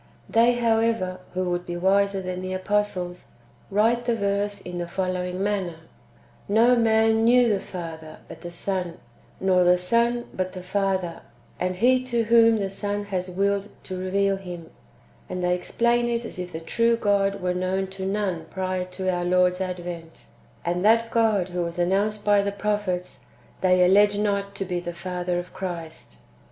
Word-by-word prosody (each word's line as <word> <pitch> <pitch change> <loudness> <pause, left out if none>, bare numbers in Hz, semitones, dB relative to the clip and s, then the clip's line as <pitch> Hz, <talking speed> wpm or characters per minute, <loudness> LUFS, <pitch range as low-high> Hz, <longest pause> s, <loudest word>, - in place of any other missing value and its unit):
They, 235 +2 +4
how^ever, 225 -5 +1 0.2
who 185 -1 0
would 175 0 -1
be 175 0 -3
wiser 195 +1 +2
than 185 0 -4
the 185 0 -4
apostles, 185 -2 -2 0.4
write 230 +4 +2
[the 240 -1 +1
verse] 200 -1 -1
in 180 -2 -6
the 175 - -3
following 185 0 -2
manner: 195 -5 -1 0.4
" - - -30
Xo 230 +4 +5
man 225 0 +3
hieic 245 0 +5
the 205 -2 +1
Father, 165 -4 -8
but - - -11
the 175 - -6
Son; 180 0 -3 0.4
nor 185 -1 +3
the 180 0 +5
Son, 235 +6 +1
but 185 0 -3
the 185 -1 -7
Father, 190 -2 -1 0.4
and 180 0 -1
he 255 +6 +3
to 235 -2 0
whom 230 0 +5
the 195 -2 -2
Son 205 +1 -3
has 185 0 -1
Milled 200 +1 +1
to 185 - -6
reveal 195 +2 0
[Him] 175 -4 -9 0.3
;" 65 0 -30
and 180 - -3
they 180 0 +2
explain 235 +6 +1
it 235 0 -1
as 205 - -8
if 180 0 -5
the 160 - -5
true 230 +8 +2
God 200 -2 +1
were 180 0 -1
known 185 +1 -1
to 190 0 -7
none 190 -4 -1
prior 185 +1 -3
to 185 +1 -6
our 180 -1 0
Lord's 180 +1 +2
advent; 175 -3 -6 0.4
and 175 +1 -1
that 230 +2 +4
God 215 -5 +2
who 180 0 -2
was 170 0 -4
announced 200 +4 0
by 205 -1 +5
the 200 0 -1
prophets, 200 -3 -3 0.4
they 185 -1 +4
allege 205 +2 +5
not 200 -1 -1
to 195 - -3
be 180 -1 -2
the 175 0 -5
Father 180 0 -3
of 175 +1 -6
Christ. 170 -4 -6
190 Hz, 180 wpm, -25 LUFS, 180-210 Hz, 0.4 s, Xo